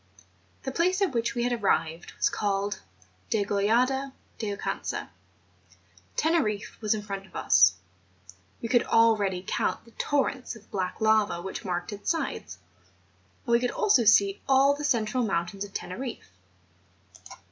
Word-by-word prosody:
The 265 - -3
place 360 +6 +1
at 380 - +1
which 230 -2 -1
we 240 - 0
had 245 0 +1
arrived 175 -7 0
was - - +3
called 200 0 -1 0.5
Degollada 230 +6 +1 0.3
de 215 - -2
Oucanca, 200 - -4 1.1
Teneriffe 250 -13 0
was 215 0 +2
in 210 - -5
front 195 -1 -6
of - - -21
us; - - +5 0.9
we - - -1
could 240 0 +4
already 205 -5 +2
count - - -1
the 230 - -18
torrents 270 -1 -1
of 220 -1 -17
black 185 -3 -3
lava 215 -4 +3
which 190 +2 -6
marked 180 +1 -3
its 205 - -4
sides; 325 -1 -2 0.9
and 240 - -2
we 235 - +5
could 245 0 0
also 400 - +3
see 200 -2 +4
all 270 +1 +5
the 290 +1 -6
central 245 -3 +1
mountains 195 -1 -2
of 205 - -8
Teneriffe. 230 - -6
220 Hz, 145 wpm, -27 LUFS, 200-255 Hz, 1.1 s, us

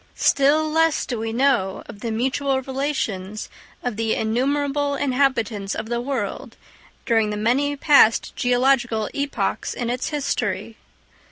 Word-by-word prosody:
Still 290 +3 +3
less 320 0 +2
do 240 -4 -3
we 225 0 -3
know 235 -6 +1
of 205 - -11
the 230 - -4
mutual 265 +4 0
relations 225 -8 -3 0.3
of 245 -4 -3
the 225 -1 0
innumerable 280 +5 0
inhabitants 250 -8 0
of 220 0 -5
the 240 0 -1
world 245 -6 -4 0.5
during 225 -3 +2
the 210 - -3
many 265 +7 +1
past 280 -6 +4
geological 245 -3 +1
epochs 280 0 -2
in 240 -1 -2
its 250 +1 -2
history. 230 -8 -2
245 Hz, 135 wpm, -22 LUFS, 220-280 Hz, 0.5 s, past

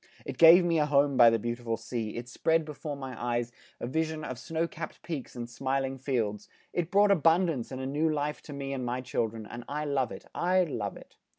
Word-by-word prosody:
It - - -6
gave 170 +2 +9
me 165 -2 +2
a 150 - +2
home 140 -1 +3
by 120 -2 +8
the 115 - +2
beautiful 120 0 -3
sea; 115 -1 -4
it 120 +1 -5
spread 160 +6 +1
before 150 -1 -6
my 135 -2 -7
eyes 120 0 -1 0.3
a - - -4
vision 160 +4 -2
of 130 -4 -5
snow 165 +2 -2
capped 165 0 -8
peaks 155 -7 -5
and 120 -1 -5
smiling 135 +2 -2
fields; 110 -6 -2 0.2
it 175 -2 -1
brought 200 +1 +5
abundance 165 -7 +2
and 130 - -5
a 130 - -4
new 150 +4 +1
life 150 0 -2
to - - -5
me 140 -1 -4
and 130 -2 -3
my 125 +1 -2
children 115 -3 -2
and 120 +3 -8
I 150 +1 -2
love 135 -4 0
it, - - -9
I 185 +1 +2
love 110 - -4
it! - - -16
135 Hz, 220 wpm, -29 LUFS, 120-160 Hz, 0.3 s, gave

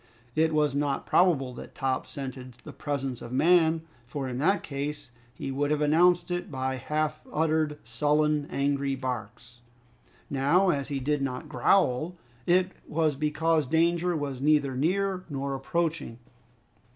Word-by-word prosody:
It 160 0 +3
was 150 -2 +2
not 140 -1 -1
probable 145 -8 +3
that - - -10
Top 130 -1 -1
scented 130 -2 -7
the - - -12
presence 135 -4 -3
of 120 - -8
man, 160 +3 +4 0.2
for 135 +1 -4
in 125 0 -4
that 195 +8 +2
case, 145 -2 -5 0.2
he 135 +2 -5
would 145 +2 0
have 150 -1 +1
announced 175 +4 +3
it 175 0 -2
by 130 -2 -2
half 155 +3 -2
uttered, 155 -1 +1
sullen, 150 +5 +1
angry 140 0 0
barks. 125 -2 -6 0.7
Now, 165 +8 +3
as 140 -3 -2
he 140 -2 -2
did 145 +2 0
not 135 +2 -3
growl, 160 -1 +2 0.3
it 185 +1 +3 0.2
was 155 -2 +1
because 155 +1 +1
danger 170 +3 +2
was 140 -3 -4
neither 145 -2 +3
near 185 +6 0
nor 140 -1 -3
approaching. 155 -2 -2
150 Hz, 145 wpm, -28 LUFS, 135-160 Hz, 0.7 s, man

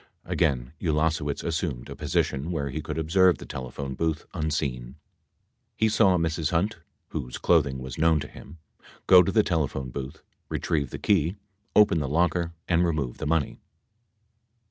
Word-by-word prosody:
Again 65 -3 0
Ulasewicz 75 -2 0
assumed 80 -7 -2
a 70 - -8
position 75 0 -1
where 70 -5 -2
he 80 +4 -3
could - - -5
observe 90 +1 +4
the - - -10
telephone 65 +1 -6
booth 80 +2 -2
unseen. 70 -7 -2 0.8
He 110 - +2
saw 100 -4 +4
Mrs. 80 -2 0
Hunt 85 +3 0 0.3
(whose 60 0 -5
clothing 75 -6 +2
was 65 +1 -7
known 80 -1 +4
to 75 - -5
him) 80 +3 -13 0.5
go 90 -1 +8
to 95 - 0
the 110 0 +4
telephone 70 -7 -1
booth, 65 +1 -7 0.3
retrieve 75 -5 -1
the - - -6
key, 90 -2 +1 0.4
open 105 -6 +5
the' 75 - -2
locker 85 +2 +1 0.2
and 85 0 +3
remove 75 -8 -1
the - - -3
money. 80 -2 0
80 Hz, 155 wpm, -26 LUFS, 70-85 Hz, 0.8 s, go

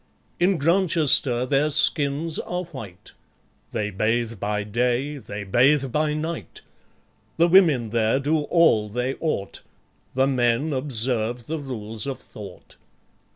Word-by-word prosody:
In 180 +1 +3
Grantchester 155 -7 +2
their 140 +3 +1
skins 150 +1 +1
are 180 +1 -3
white; 100 - -10 0.6
They 105 -1 -3
bathe 110 +2 -1
by 105 +1 -2
day, 125 +7 -1
they 105 -4 -7
bathe 130 +6 +3
by 150 +2 0
night; 160 +2 -5 0.8
The 170 +1 +4
women 160 - +4
there 115 +2 +2
do 150 +3 +1
all 130 -13 +3
they 125 +4 -2
ought; 125 -12 -3 0.5
The 130 +1 +3
men 130 +3 +1
observe 120 -3 -2
the 160 +4 -4
Rules 115 -4 -6
of 135 - -3
Thought. 100 -4 -12
130 Hz, 125 wpm, -23 LUFS, 110-155 Hz, 0.8 s, The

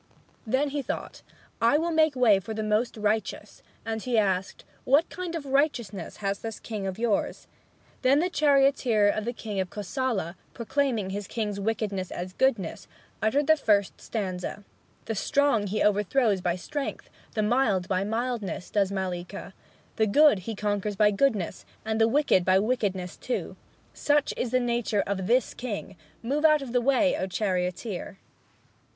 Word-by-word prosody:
Then 265 +6 +1
he 285 +1 -2
thought, - - -5 0.4
"I 235 +5 +5
will 335 +2 0
make 315 -3 +3
way 230 -6 +5
for 220 +3 -6
the 220 - -2
most 215 +3 0
righteous." 210 -1 -2 0.2
And 225 0 -3
he 245 0 0
asked, 195 -3 0 0.2
"What 285 +6 +4
kind 355 -2 -5
of 315 -4 -4
righteousness 255 - -1
has 195 0 0
this 225 -2 -6
king 210 -4 -5
of 190 0 -4
yours?" 225 -3 -1 0.6
Then 265 +2 +4
the 360 +3 0
chorister 275 -8 +3
of 215 +1 -1
the 240 - -1
king 210 -4 -5
of 185 -1 -1
Kosala, 205 - -3 0.2
proclaiming 235 -4 -1
his 200 0 -4
king's 210 -3 -3
wickedness 200 -3 -2
as 180 +1 -6
goodness, 225 -10 0 0.3
uttered 270 +7 +2
the 315 - +6
First 205 -9 +1
Stanza: 195 -1 -4 0.4
"The 225 - -2
strong 235 0 +2
he 210 +3 0
overthrows 210 0 +2
by 175 -1 0
strength, 285 +10 -5 0.2
The 215 - +1
mild 210 -5 +2
by 185 0 0
mildness, 225 -3 -3
does 200 -2 +1
Mallika; 180 -1 -4 0.4
The 220 - +3
good 290 0 +5
he 215 +5 -5
conquers 205 0 -1
by 210 +1 +4
goodness, 205 -5 0 0.2
And 220 0 0
the 225 - +6
wicked 255 -7 +3
by 185 +1 +4
wickedness 195 -5 -1
too. 250 - -3 0.4
Such 290 -1 +1
is 245 - -2
the 255 +2 +2
nature 235 -4 0
of 190 -2 -2
this 245 +2 +2
king! 205 -5 -5 0.3
Move 280 +6 -1
out 305 -2 +5
of 255 - -7
the 245 - +3
way, 275 +2 +3
O 190 - -2
charioteer!" 185 +1 -2
220 Hz, 165 wpm, -27 LUFS, 195-260 Hz, 0.6 s, the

